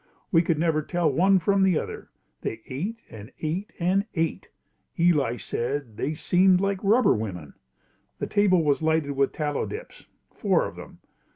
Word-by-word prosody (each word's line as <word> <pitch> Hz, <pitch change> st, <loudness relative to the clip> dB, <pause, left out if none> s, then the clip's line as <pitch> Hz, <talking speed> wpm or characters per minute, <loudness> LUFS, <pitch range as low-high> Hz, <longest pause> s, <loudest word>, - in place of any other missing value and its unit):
We 165 Hz, -, +5 dB
could 165 Hz, -2 st, 0 dB
never 160 Hz, -1 st, +1 dB
tell 170 Hz, 0 st, 0 dB
one 190 Hz, +7 st, +4 dB
from 195 Hz, +3 st, +2 dB
the 190 Hz, -4 st, +4 dB
other. -, -, -6 dB, 0.3 s
They 110 Hz, -, -4 dB
ate 185 Hz, -, -4 dB
and 110 Hz, +2 st, -10 dB
ate 170 Hz, +6 st, -3 dB
and 190 Hz, +4 st, +1 dB
ate. 165 Hz, -1 st, -2 dB, 0.5 s
Eli 150 Hz, -8 st, +2 dB
said, 125 Hz, -1 st, -3 dB
"They 150 Hz, +8 st, -2 dB
seemed 180 Hz, +3 st, +3 dB
like 195 Hz, 0 st, -1 dB
rubber 225 Hz, +5 st, +4 dB
women." 90 Hz, -9 st, -5 dB, 0.6 s
The -, -, -3 dB
table 195 Hz, -4 st, +3 dB
was 145 Hz, 0 st, +1 dB
lighted 160 Hz, -2 st, +1 dB
with 140 Hz, 0 st, +1 dB
tallow 150 Hz, -2 st, -2 dB
dips, 465 Hz, +4 st, -9 dB, 0.3 s
four -, -, +1 dB
of -, -, -7 dB
them. -, -, -12 dB
165 Hz, 165 wpm, -25 LUFS, 140-190 Hz, 0.6 s, We